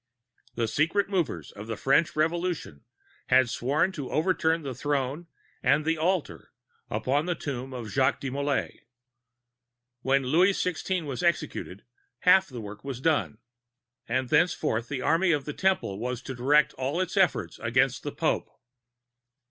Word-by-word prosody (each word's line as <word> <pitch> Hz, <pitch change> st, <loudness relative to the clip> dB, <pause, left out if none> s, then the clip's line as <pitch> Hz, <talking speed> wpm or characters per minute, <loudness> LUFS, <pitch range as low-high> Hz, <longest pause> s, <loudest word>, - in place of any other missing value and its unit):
The 115 Hz, -1 st, 0 dB
secret 165 Hz, -, +1 dB
movers 165 Hz, -, -2 dB
of 105 Hz, +2 st, -10 dB
the 115 Hz, -, -4 dB
French 140 Hz, +5 st, +2 dB
Revolution 165 Hz, -, -1 dB, 0.4 s
had 130 Hz, -2 st, +4 dB
sworn 150 Hz, +11 st, +1 dB
to 145 Hz, -8 st, -6 dB
overturn 165 Hz, -1 st, +1 dB
the 135 Hz, -2 st, -4 dB
Throne 145 Hz, +4 st, -2 dB, 0.3 s
and 145 Hz, +4 st, +3 dB
the 160 Hz, 0 st, +2 dB
Altar 170 Hz, +1 st, -2 dB, 0.4 s
upon 135 Hz, +9 st, 0 dB
the 175 Hz, -, 0 dB
Tomb 135 Hz, -4 st, -5 dB
of 120 Hz, -3 st, -6 dB
Jacques 130 Hz, -1 st, +2 dB
de 135 Hz, -, -4 dB
Molai. 140 Hz, +1 st, -1 dB, 1.2 s
When 135 Hz, +1 st, +2 dB
Louis 175 Hz, +9 st, +4 dB
XVI. 180 Hz, -1 st, -1 dB
was 140 Hz, 0 st, -4 dB
executed, 170 Hz, -1 st, -1 dB, 0.4 s
half 190 Hz, +1 st, +6 dB
the 125 Hz, -3 st, -7 dB
work 105 Hz, 0 st, -9 dB
was 135 Hz, -3 st, -5 dB
done; 150 Hz, -6 st, +1 dB, 0.7 s
and 130 Hz, +1 st, -1 dB
thenceforward 150 Hz, -7 st, +2 dB
the 130 Hz, +1 st, -4 dB
Army 170 Hz, +2 st, +3 dB
of 145 Hz, -2 st, -1 dB
the 150 Hz, -, -4 dB
Temple 185 Hz, -, 0 dB
was 125 Hz, +1 st, -3 dB
to 130 Hz, -, -5 dB
direct 145 Hz, +4 st, +3 dB
all 135 Hz, +6 st, -1 dB
its 185 Hz, +1 st, -2 dB
efforts 190 Hz, -3 st, +1 dB
against 130 Hz, +3 st, +1 dB
the 145 Hz, -, -4 dB
Pope. 160 Hz, -, -1 dB
145 Hz, 150 wpm, -27 LUFS, 130-165 Hz, 1.2 s, half